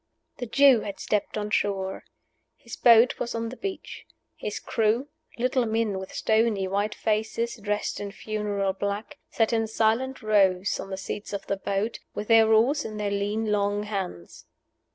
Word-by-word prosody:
The 245 Hz, -, -5 dB
Jew 270 Hz, 0 st, +6 dB
had 200 Hz, -2 st, -6 dB
stepped 210 Hz, 0 st, -1 dB
on 210 Hz, 0 st, -3 dB
shore. 195 Hz, -2 st, -1 dB, 0.5 s
His -, -, -9 dB
boat 235 Hz, 0 st, +5 dB
was 235 Hz, -, -3 dB
on 230 Hz, 0 st, -2 dB
the 255 Hz, -, -8 dB
beach. 385 Hz, +6 st, -6 dB, 0.3 s
His -, -, -5 dB
crew 230 Hz, +5 st, 0 dB, 0.3 s
little 250 Hz, 0 st, +1 dB
men 220 Hz, -3 st, 0 dB
with 190 Hz, -, -8 dB
stony, 220 Hz, -3 st, +1 dB
white 205 Hz, +2 st, -1 dB
faces, 220 Hz, +2 st, -1 dB
dressed 210 Hz, -1 st, -2 dB
in 205 Hz, -1 st, -5 dB
funeral 205 Hz, -2 st, -2 dB
black 200 Hz, +9 st, -4 dB
sat 225 Hz, 0 st, +1 dB
in 225 Hz, -1 st, +1 dB
silent 225 Hz, +4 st, 0 dB
rows 195 Hz, -3 st, +2 dB
on -, -, -6 dB
the 190 Hz, -, -4 dB
seats 200 Hz, +2 st, -6 dB
of 200 Hz, -, -4 dB
the 195 Hz, -, -2 dB
boat, 200 Hz, +3 st, -2 dB, 0.2 s
with 210 Hz, -, -5 dB
their 225 Hz, -1 st, +6 dB
oars 245 Hz, +7 st, +4 dB
in 215 Hz, -1 st, -6 dB
their 205 Hz, -1 st, -2 dB
lean, 205 Hz, +2 st, -1 dB
long 205 Hz, 0 st, +1 dB
hands. 190 Hz, -, -6 dB
215 Hz, 170 wpm, -26 LUFS, 200-230 Hz, 0.5 s, Jew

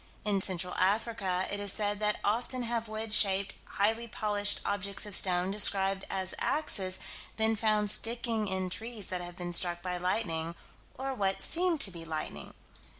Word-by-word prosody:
In 200 Hz, -2 st, 0 dB
Central 180 Hz, -1 st, -4 dB
Africa, 195 Hz, -2 st, -1 dB
it 205 Hz, -, -3 dB
is 205 Hz, -1 st, -3 dB
said 205 Hz, -1 st, -3 dB
that 210 Hz, 0 st, -1 dB
often 245 Hz, +4 st, -2 dB
have 230 Hz, -1 st, -3 dB
wedge 215 Hz, 0 st, -4 dB
shaped, 195 Hz, -1 st, +3 dB
highly 225 Hz, +3 st, -1 dB
polished 210 Hz, -3 st, 0 dB
objects 200 Hz, 0 st, -2 dB
of 205 Hz, -2 st, -5 dB
stone, 180 Hz, 0 st, +2 dB
described 195 Hz, -1 st, +5 dB
as 190 Hz, -1 st, -2 dB
"axes," 195 Hz, -11 st, +4 dB, 0.4 s
been 220 Hz, 0 st, +1 dB
found 215 Hz, -1 st, 0 dB
sticking 230 Hz, -1 st, +1 dB
in 190 Hz, -1 st, -3 dB
trees 225 Hz, 0 st, -5 dB
that 180 Hz, -1 st, -4 dB
have 175 Hz, 0 st, -9 dB
been 175 Hz, -1 st, -5 dB
struck 175 Hz, 0 st, 0 dB
by 180 Hz, -1 st, -4 dB
lightning 170 Hz, -3 st, -2 dB, 0.4 s
or 265 Hz, +2 st, -5 dB
by 260 Hz, -, -8 dB
what 195 Hz, -1 st, +1 dB
seemed 345 Hz, -3 st, +2 dB
to 195 Hz, -, +5 dB
be 170 Hz, -2 st, -8 dB
lightning. 160 Hz, -1 st, -7 dB
205 Hz, 170 wpm, -29 LUFS, 185-220 Hz, 0.4 s, described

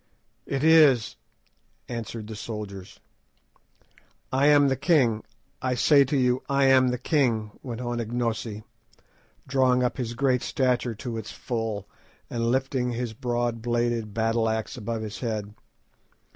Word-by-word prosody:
"It 135 Hz, 0 st, -2 dB
is," 155 Hz, -8 st, +5 dB, 0.7 s
answered 115 Hz, -2 st, -5 dB
the 110 Hz, 0 st, -7 dB
soldiers. 105 Hz, -3 st, -7 dB, 1.3 s
"I 135 Hz, +2 st, +3 dB
am 145 Hz, -1 st, +6 dB
the 135 Hz, -, +2 dB
king; 125 Hz, -9 st, +2 dB, 0.4 s
I 130 Hz, -1 st, 0 dB
say 140 Hz, +3 st, +5 dB
to 140 Hz, +2 st, 0 dB
you, 125 Hz, -1 st, +2 dB
I 140 Hz, 0 st, +3 dB
am 130 Hz, -1 st, +5 dB
the 125 Hz, 0 st, 0 dB
king," 120 Hz, -6 st, +1 dB
went 120 Hz, -2 st, -6 dB
on 120 Hz, -1 st, -3 dB
Ignosi, 115 Hz, -2 st, -3 dB, 0.8 s
drawing 130 Hz, -1 st, +3 dB
up 125 Hz, -, -1 dB
his 120 Hz, -2 st, -3 dB
great 130 Hz, -1 st, +2 dB
stature 125 Hz, -3 st, 0 dB
to 115 Hz, +1 st, -5 dB
its 110 Hz, -2 st, -6 dB
full, 115 Hz, -4 st, -4 dB, 0.4 s
and 115 Hz, -1 st, -1 dB
lifting 130 Hz, -1 st, 0 dB
his 120 Hz, -1 st, -3 dB
broad 120 Hz, -1 st, -2 dB
bladed 120 Hz, -2 st, -1 dB
battle 115 Hz, +1 st, +1 dB
axe 110 Hz, +3 st, -3 dB
above 115 Hz, -2 st, -4 dB
his 105 Hz, -1 st, -6 dB
head. 105 Hz, -4 st, -3 dB
120 Hz, 140 wpm, -26 LUFS, 110-130 Hz, 1.3 s, am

